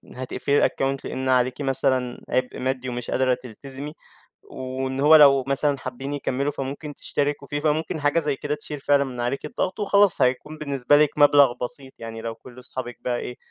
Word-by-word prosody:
هتقفِلي 130 Hz, +2 st, +1 dB
الaccount 135 Hz, 0 st, -1 dB
لأن 130 Hz, 0 st, -3 dB
عليكِ 130 Hz, +1 st, +2 dB
مثلًا 130 Hz, -2 st, 0 dB
عِبء 130 Hz, 0 st, -1 dB
مادّي 130 Hz, 0 st, -2 dB
ومش 120 Hz, -1 st, -5 dB
قادرة 130 Hz, -1 st, +2 dB
تلتزمي 135 Hz, +5 st, -8 dB, 0.5 s
وإن 130 Hz, +1 st, -5 dB
هو 150 Hz, +3 st, +7 dB
لو 140 Hz, -3 st, +7 dB
مثلًا 140 Hz, +1 st, +1 dB
حابّين 130 Hz, +2 st, -6 dB
يكمّلوا 140 Hz, 0 st, -1 dB
فممكن 145 Hz, +2 st, -6 dB
تشتركوا 145 Hz, 0 st, -2 dB
فيه، 145 Hz, +1 st, -2 dB
فممكن 155 Hz, +1 st, -1 dB
حاجة 145 Hz, +3 st, +2 dB
زي 150 Hz, -3 st, -1 dB
كده 145 Hz, +2 st, -3 dB
تشيل 150 Hz, 0 st, -8 dB
فعلًا 140 Hz, 0 st, +3 dB
من 130 Hz, -3 st, -7 dB
عليكِ 125 Hz, +3 st, -2 dB
الضغط 190 Hz, -4 st, -3 dB
وخلاص، 200 Hz, -4 st, +3 dB
هيكون 130 Hz, +5 st, 0 dB
بالنسبة 140 Hz, -2 st, +2 dB
لِك 150 Hz, 0 st, +4 dB
مبلَغ 145 Hz, -3 st, +6 dB
بسيط 135 Hz, +1 st, -6 dB
يعني، 115 Hz, -1 st, -7 dB
لو 115 Hz, 0 st, -5 dB
كلّ 125 Hz, +2 st, -14 dB
أصحابك 125 Hz, -1 st, -7 dB
بقى 120 Hz, -1 st, -1 dB
إيه، 125 Hz, -, -6 dB
135 Hz, 180 wpm, -24 LUFS, 130-145 Hz, 0.5 s, هو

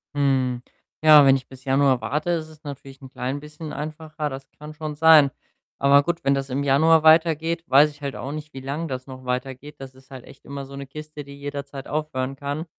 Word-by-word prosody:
Hm, 130 Hz, -3 st, +1 dB, 0.4 s
ja, 155 Hz, -2 st, +9 dB
wenn 135 Hz, 0 st, +6 dB
ich 130 Hz, -, -5 dB
bis 130 Hz, 0 st, -15 dB
Januar 135 Hz, -2 st, +3 dB
warte, 150 Hz, +9 st, -2 dB
ist 160 Hz, -2 st, -2 dB
es 155 Hz, 0 st, -17 dB
natürlich 140 Hz, -1 st, -9 dB
'n 130 Hz, -, -11 dB
klein 135 Hz, +2 st, -4 dB
bisschen 150 Hz, +1 st, -9 dB
einfacher. 155 Hz, 0 st, -5 dB
Das 135 Hz, 0 st, -8 dB
kann 150 Hz, +1 st, -10 dB
schon 155 Hz, -1 st, -6 dB
sein. 155 Hz, -2 st, +7 dB, 0.5 s
Aber 140 Hz, +1 st, +5 dB
gut, 170 Hz, -2 st, -3 dB
wenn 140 Hz, -, +3 dB
das 135 Hz, 0 st, -2 dB
im 140 Hz, +3 st, -2 dB
Januar 160 Hz, +3 st, +4 dB
weitergeht, 165 Hz, +1 st, +3 dB
weiß 145 Hz, +3 st, +5 dB
ich 145 Hz, -, -20 dB
halt 140 Hz, -2 st, -4 dB
auch 135 Hz, +3 st, -6 dB
nicht, 155 Hz, 0 st, -8 dB
wie 135 Hz, -, -7 dB
lang 145 Hz, +5 st, -4 dB
das 130 Hz, -1 st, -6 dB
noch 130 Hz, -1 st, -10 dB
weitergeht. 130 Hz, +3 st, -4 dB
Das 135 Hz, -1 st, -9 dB
ist 130 Hz, +1 st, -20 dB
halt 130 Hz, -2 st, -10 dB
echt 135 Hz, -1 st, -17 dB
immer 140 Hz, -1 st, -7 dB
so 140 Hz, +1 st, -11 dB
'ne 140 Hz, 0 st, -7 dB
Kiste, 150 Hz, +1 st, -9 dB
die 140 Hz, 0 st, -12 dB
jederzeit 140 Hz, -1 st, -7 dB
aufhören 135 Hz, -3 st, -3 dB
kann. 145 Hz, +3 st, -4 dB
140 Hz, 220 wpm, -23 LUFS, 135-155 Hz, 0.5 s, ja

